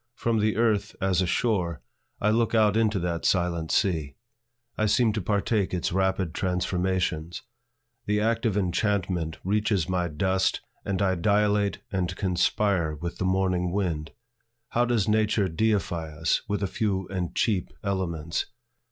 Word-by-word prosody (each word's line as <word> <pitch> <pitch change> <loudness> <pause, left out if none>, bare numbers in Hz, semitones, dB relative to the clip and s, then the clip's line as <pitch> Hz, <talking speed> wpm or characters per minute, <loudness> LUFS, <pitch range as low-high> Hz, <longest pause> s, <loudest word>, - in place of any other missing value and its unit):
From 115 -1 0
the 105 0 +1
earth, 110 -3 +1
as 95 -2 +2
a 90 - 0
shore, 90 -8 0 0.4
I 105 - +2
look 115 +1 +1
out 105 -2 +4
into 110 -2 +2
that 85 -1 -2
silent 85 -3 +1
sea. 80 -7 +1 0.6
I 110 - +1
seem 110 +1 +3
to 110 - -2
partake 100 0 0
its 90 - -1
rapid 95 -2 0
transformations: 90 -3 -1 0.6
the 105 0 +2
active 115 -1 +1
enchantment 90 -4 0
reaches 100 -3 +1
my 90 -1 0
dust, 95 +4 0 0.2
and 100 0 -1
I 95 -1 +2
dilate 105 +2 +1
and 90 -2 -1
conspire 90 -3 +1
with 85 +3 -6
the 95 - 0
morning 90 -1 +1
wind. 85 -5 -2 0.6
How 120 +1 +2
does 120 -5 +1
Nature 105 -1 +2
deify 85 -3 0
us 80 0 +1
with 105 -1 -1
a - - +1
few 95 -2 -1
and 90 -3 -3
cheap 100 -6 +1
elements! 85 -5 -2
95 Hz, 145 wpm, -26 LUFS, 90-105 Hz, 0.6 s, out